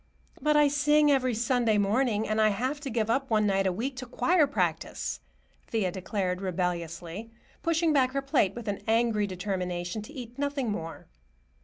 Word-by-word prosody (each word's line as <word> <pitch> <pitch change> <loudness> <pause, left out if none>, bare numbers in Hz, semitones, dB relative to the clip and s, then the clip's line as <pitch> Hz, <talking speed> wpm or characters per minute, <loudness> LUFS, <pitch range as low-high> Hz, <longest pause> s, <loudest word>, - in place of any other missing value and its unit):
"But 300 0 +3
I 295 -1 +6
sing 295 +1 +4
every 255 -3 +2
Sunday 235 -1 +2
morning, 215 +2 +1
and 215 0 +1
I 215 - +5
have 255 +8 -1
to 285 -2 -5
give 225 -3 0
up 270 +4 0
one 215 -2 +3
night 195 -1 +2
a - - +2
week 250 +9 -3
to 255 -1 -6
choir 325 +5 +3
practice," 280 - -2 0.5
Thea 210 -5 0
declared 190 0 -2
rebelliously, 180 +2 -3 0.3
pushing 330 -1 +2
back 260 -2 +3
her 275 - 0
plate 270 -9 +2
with 235 -2 -7
an 200 -1 -2
angry 225 -2 +2
determination 180 0 -3
to 245 +8 -11
eat 245 -2 -9
nothing 280 -5 -1
more. 165 -5 -6
225 Hz, 175 wpm, -28 LUFS, 195-275 Hz, 0.5 s, I